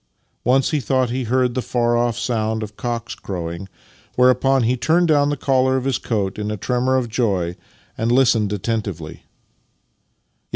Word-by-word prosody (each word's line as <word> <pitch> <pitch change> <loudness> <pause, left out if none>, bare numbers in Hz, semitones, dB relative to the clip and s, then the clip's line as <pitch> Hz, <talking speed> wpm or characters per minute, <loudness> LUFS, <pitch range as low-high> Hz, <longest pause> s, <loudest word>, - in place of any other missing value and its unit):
Once 130 +2 +2
he 155 - +1
thought 130 0 0
he 130 0 -2
heard 125 +1 +1
the 130 - -1
far 120 -1 0
off 120 -1 +1
sound 110 -2 -1
of 105 0 -8
cocks 120 0 -4
crowing, 85 0 -6 0.5
whereupon 130 +1 +4
he 120 +3 +2
turned 165 +7 +2
down 145 -2 +3
the 145 - -1
collar 130 -1 +2
of 130 - -3
his 135 -2 0
coat 100 -4 -2
m 105 0 -3
a 105 - -3
tremor 125 +5 0
of 125 -2 -1
joy 100 -7 -1 0.4
and 115 +1 +1
listened 120 -5 +3
attentively; 100 -6 -3
yet. - - -19
120 Hz, 170 wpm, -20 LUFS, 105-130 Hz, 0.5 s, whereupon